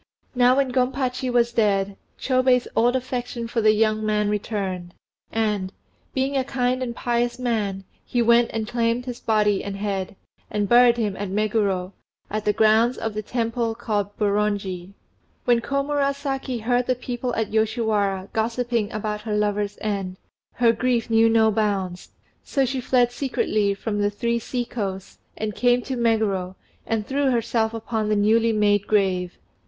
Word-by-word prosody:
Now 250 0 +4
when 275 -2 +1
Gompachi 255 0 0
was 235 -1 +2
dead, 200 -3 +1 0.2
Chôbei's 255 -1 +2
old 240 +2 +3
affection 245 -2 -3
for 230 0 -1
the 215 0 +5
young 215 0 +1
man 210 -1 +1
returned, 195 -4 -3 0.4
and, 210 -4 -1 0.4
being 270 +1 0
a 265 - +2
kind 255 -1 -1
and 240 -2 -3
pious 240 0 -1
man, 215 -6 -1 0.2
he 245 - -2
went 235 0 +4
and 220 -1 -3
claimed 235 +1 0
his 245 -2 -6
body 210 -2 +1
and 200 -1 -5
head, 200 0 -3 0.3
and 205 -1 -1
buried 240 +1 +6
him 210 -4 -1
at 205 -1 -4
Meguro, 200 -2 0 0.4
in 215 - 0
the 210 - +3
grounds 220 +3 +3
of 225 -1 -3
the 215 - -3
Temple 230 0 -2
called 210 -4 -2
Boronji. 200 -3 -1 0.5
When 240 -1 +3
Komurasaki 275 -2 -1
heard 245 +1 +1
the 255 - +2
people 245 0 -4
at 225 -1 -1
Yoshiwara 215 -3 0
gossiping 230 -1 -1
about 210 0 -3
her 210 -1 -3
lover's 205 -1 -1
end, 195 -3 -3 0.4
her 230 -1 +3
grief 240 -1 0
knew 225 0 +5
no 220 -1 +4
bounds, 200 -4 -1 0.3
so 275 -1 +1
she 260 0 -2
fled 245 -1 +2
secretly 215 -6 0
from 205 0 -3
"The 205 - +2
Three 235 +3 -1
Sea 245 +1 -3
coasts," 195 -5 -5 0.2
and 215 -1 -3
came 245 0 +2
to 265 - -4
Meguro 215 -6 0 0.3
and 225 -2 -1
threw 275 +2 +1
herself 230 -2 0
upon 220 -1 -2
the 215 - +2
newly 220 +3 +3
made 205 -2 +2
grave. 185 -4 +1
225 Hz, 160 wpm, -23 LUFS, 205-245 Hz, 0.5 s, buried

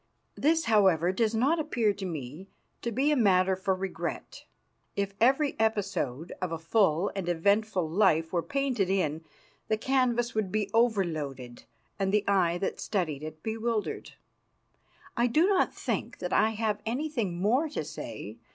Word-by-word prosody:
This, 320 +2 +2
however, 190 -6 +4
does 225 +3 0
not 280 +9 +2
appear 240 -9 +1
to 195 -1 -5
me 155 +3 -7 0.3
to 235 - -2
be 270 +6 +2
a - - +3
matter 190 -6 +3
for 190 0 0
regret. 190 0 -5 0.5
If 200 0 -2
every 275 +4 +3
episode 195 - -1
of 185 -2 -2
a 165 - -2
full 165 +1 +2
and 190 -3 -3
eventful 200 +1 +1
life 165 -2 +2
were 175 - +2
painted 245 - -1
in, 160 -5 0 0.4
the 215 - +1
canvas 240 -1 +1
would 215 -4 -1
be 210 -2 -1
overloaded 155 - -1 0.3
and 195 -1 +1
the 210 0 +1
eye 180 -4 +2
that 190 - -3
studied 165 -9 -2
it 155 0 -8
bewildered. 225 0 -3 1.0
I 240 0 +2
do 305 +8 +3
not 390 -1 +2
think - - -3
that 180 - -4
I 215 +1 +4
have 215 -2 -1
anything 235 - -2
more 250 - +2
to - - -3
say. - - -8
200 Hz, 155 wpm, -28 LUFS, 175-235 Hz, 1.0 s, however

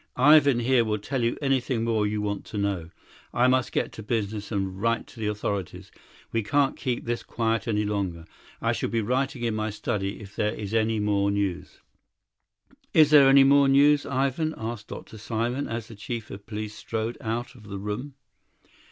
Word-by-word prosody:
Ivan 140 -2 +6
here 125 0 +3
will 110 -1 -1
tell 125 +5 -3
you 115 - 0
anything 130 -3 +1
more 110 -2 +1
you 105 0 -2
want 100 -1 -2
to 105 - -7
know; 100 -5 -1 0.5
I 120 - +4
must 130 0 +2
get - - -1
to - - -9
business 105 -1 -3
and 95 -2 -2
write 115 +1 +1
to 120 - -15
the 110 - -1
authorities. 100 -3 -3 0.4
We 115 - +1
can't 140 +6 +1
keep 125 -2 -3
this 120 0 -2
quiet 115 0 -1
any 105 -2 +1
longer. 95 -5 -2 0.4
I - - +2
shall - - -2
be 115 - 0
writing 130 +2 -1
in 115 -2 0
my 110 0 -1
study 100 -2 -3
if 105 -2 -12
there 105 +1 0
is 105 0 -6
any 110 -1 +2
more 100 -1 +1
news." 100 -3 -2 1.1
"Is 155 -2 +6
there 140 -3 +8
any 135 0 +8
more 140 0 +5
news, 145 +2 +5
Ivan?" 140 +4 0
asked 110 -1 -5
Dr. 110 - -9
Simon, 120 +5 -2
as 115 -1 -4
the 115 - -11
chief 110 +2 -6
of 100 +1 -10
police 105 -1 -5
strode 110 +3 -4
out 120 +1 -3
of 115 -5 -16
the 100 -1 -5
room. 105 +8 -5
115 Hz, 190 wpm, -26 LUFS, 105-130 Hz, 1.1 s, there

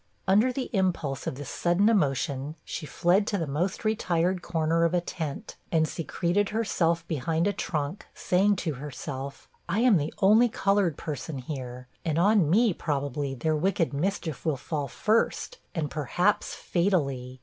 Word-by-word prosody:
Under 210 +7 +4
the 255 0 -4
impulse 170 - 0
of - - -2
this 140 0 -7
sudden 175 +4 +2
emotion, 140 - +1
she 155 - -5
fled 185 +7 +2
to 205 - 0
the 165 - -1
most 175 +9 -2
retired 180 -4 +1
corner 165 -1 +1
of 170 +1 +2
a - - +4
tent, 160 -4 -5
and 160 -1 +3
secreted 175 +5 -1
herself 170 -7 0
behind 160 +3 0
a 205 - +2
trunk. 155 -2 -3
saying 200 +3 +2
to 165 -4 -2
herself, 140 0 -7 0.2
'I 205 - +1
am 240 -6 +6
the 150 0 -2
only 215 +5 +5
colored 195 -6 +1
person 150 0 -5
here, 125 -2 -6 0.2
and 160 -2 -1
on 195 -2 +4
me, 215 +3 +4
probably, 145 -3 -2
their 155 +5 0
wicked 170 -1 +1
mischief 160 -1 -2
will 155 -4 0
fall 145 +2 -3
first, 230 - 0 0.2
and 155 -4 -2
perhaps 175 +7 0
fatally.' 140 -9 -1
165 Hz, 160 wpm, -27 LUFS, 145-195 Hz, 0.2 s, am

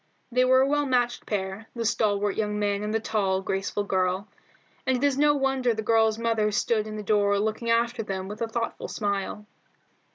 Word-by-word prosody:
They 250 +1 +3
were 260 0 +5
a 265 - +3
well 290 0 +1
matched 245 -2 0
pair, 195 +1 -3
the 230 -1 -3
stalwart 210 -3 +1
young 210 -1 -1
man 205 -1 0
and 210 0 -3
the 225 - +1
tall, 195 -4 0
graceful 195 +2 -2
girl, 190 0 0 0.6
and 260 -1 +3
it 250 - -4
is 285 -2 +3
no 295 +1 +4
wonder 265 -4 +1
the 220 - -3
girl's 220 0 +3
mother 225 -2 +1
stood 215 +1 0
in 215 - -6
the 210 - -5
door 205 -1 +2
looking 220 +3 -1
after 235 +1 +1
them 190 -3 -4
with 210 +3 -8
a 230 - 0
thoughtful 230 +1 -3
smile. 205 0 -3
220 Hz, 200 wpm, -26 LUFS, 205-235 Hz, 0.6 s, were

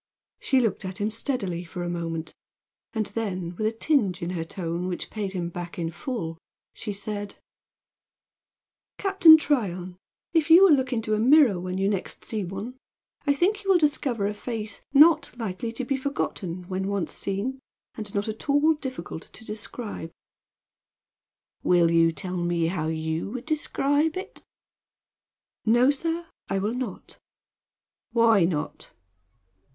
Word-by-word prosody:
She 265 - +2
looked 225 -5 0
at 185 +1 -5
him 210 +1 0
steadily 205 -7 -2
for 175 +1 -6
a - - -3
moment, 165 -2 -4 0.6
and 220 -2 -1
then, 185 -6 -3
with 215 +4 0
a - - +1
tinge 225 - +1
in 170 - -2
her 170 -3 -2
tone 170 +1 -4
which 180 - -4
paid 205 -3 -3
him 175 -2 -2
back 175 0 -7
in 165 -2 -2
full, 175 - -4 0.3
she 215 - -5
said: 205 0 -5 1.6
"Captain 380 -5 +8
Tryon, 185 - -1 0.4
if 325 -2 +2
you 340 +4 +9
will 380 -5 +8
look 260 -2 +1
into 225 -3 -1
a 210 - +2
mirror 255 - +6
when 185 +1 -4
you 195 +1 +1
next 200 -2 -3
see 215 -3 -2
one 195 +8 -6 0.5
I 285 - +4
think 410 +7 +1
you 390 - -4
will 380 - +7
discover 285 -9 +1
a 205 - 0
face 220 0 -5
not 300 -2 +5
likely 225 0 -3
to 255 +2 -3
be 275 +1 0
forgotten 185 -10 -3
when 190 0 -2
once 200 -3 -2
seen, 210 +7 -2 0.3
and 215 -2 -7
not 200 +1 0
at 220 +6 -6
all 290 +3 +5
difficult 260 - -7
to 220 - -11
describe." 210 -4 -6 1.5
"Will 175 -2 +4
you 165 0 +5
tell 180 +2 -4
me 175 -1 0
how 165 -2 -1
you 160 +2 -2
would 240 +2 -6
describe 305 +1 +1
it?" 375 - -7 1.2
"No, 240 +4 +5
sir. 330 +4 -2 0.2
I 195 - 0
will 205 +4 -1
not." 250 -6 -6 0.9
"Why 225 -6 +5
not?" 160 -4 -3
210 Hz, 155 wpm, -26 LUFS, 180-265 Hz, 1.6 s, you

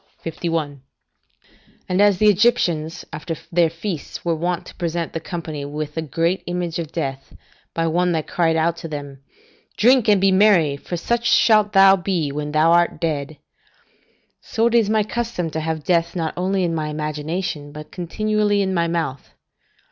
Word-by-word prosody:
51.] 160 -4 -3 1.1
And 185 +2 +1
as 205 -2 +5
the 215 - +2
Egyptians 175 -6 +2
after 160 +2 -4 0.2
their 170 -1 +3
feasts 170 -1 -6
were 170 - +2
wont 175 +2 -2
to - - -11
present 170 -1 -3
the 165 - -2
company 160 -3 -6
with 150 +1 -5
a 160 - -1
great 165 +4 -1
image 175 -1 -3
of 160 -2 -5
death, 135 -5 -5 0.4
by 165 - 0
one 175 +2 +1
that 160 -2 -1
cried 165 -2 +1
out 165 +1 +1
to 165 - -7
them, 145 -3 -7 0.6
"Drink 245 +1 +4
and 205 -2 +5
be 195 0 +3
merry, 185 -7 +4
for 175 +5 -6
such 235 +6 0
shalt 215 -2 +4
thou 195 0 +7
be 175 -5 -1
when 150 +1 -4
thou 155 +2 +3
art 170 0 +3
dead"; 155 -3 -2 1.0
so 225 - -1
it 235 - +2
is 230 -3 +3
my 215 -1 +2
custom 215 -7 -3
to 160 - -3
have 160 -1 -3
death 170 0 +1
not 165 -3 -2
only 190 +1 0
in 170 -2 0
my 155 -2 -2
imagination, 150 0 -4
but 150 +1 -10
continually 205 +3 0
in 190 -1 -1
my 170 -2 +1
mouth. 165 -6 -4
170 Hz, 175 wpm, -21 LUFS, 155-190 Hz, 1.1 s, thou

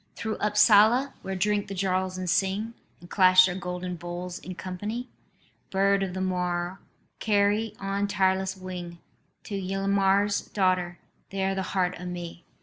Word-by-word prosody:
"Through 220 -1 -3
Upsala, 215 +5 +5
where 190 - -4
drink 205 +2 0
the 195 - -6
Jarls 185 0 -1
and 185 0 -4
sing, 195 +5 0 0.3
And 175 - -14
clash 185 -1 +7
their 180 - -1
golden 180 -1 -5
bowls 175 +1 -6
in 185 - -8
company, 210 +8 -5 0.6
Bird 195 +1 +2
of 190 -2 -3
the 190 - -3
moor, 180 0 -2 0.4
carry 210 +1 +1
on 195 +1 -1
tireless 190 -1 +1
wing 180 -2 -7 0.5
To - - -8
Ylmer's 195 +1 +1
daughter 185 -3 0 0.3
there 195 0 -1
the 195 - -2 0.2
heart 180 -1 0
of 180 - -6
me. 175 -1 -7
190 Hz, 145 wpm, -27 LUFS, 180-200 Hz, 0.6 s, clash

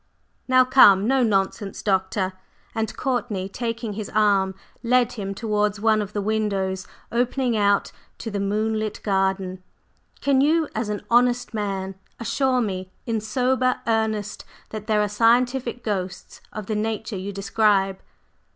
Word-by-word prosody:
"Now 255 0 +5
come, 210 -6 +6
no 265 +1 +3
nonsense, 195 -2 0
Doctor," 190 -1 0 0.4
and 220 -1 -3
Courtney, 240 -7 -1
taking 230 +1 -4
his 210 0 -5
arm, 200 -3 +3 0.3
led 250 0 +3
him 195 -3 -5
towards 210 -1 0
one 215 0 +3
of 205 0 -6
the 205 - -2
windows 200 -3 -1 0.2
opening 245 +1 0
out 205 -1 +2 0.3
to 225 - -6
the 200 - -2
moonlit 215 +2 -1
garden, 190 -2 0 0.6
"can 275 -1 +3
you, 315 +2 +3
as 220 0 -2
an 210 -1 -3
honest 245 0 +3
man, 195 -3 -3 0.3
assure 255 +2 +1
me 185 -4 -3
in 225 -2 -1
sober 255 +3 +1
earnest 220 -2 -1 0.3
that 215 -1 -7
there 210 -1 +3
are - - 0
'scientific 240 +3 +2
ghosts' 185 -4 -4
of 215 -2 -6
the 215 - -3
nature 215 0 -2
you 195 +1 -4
describe?" 200 -1 +1
215 Hz, 140 wpm, -23 LUFS, 195-235 Hz, 0.6 s, come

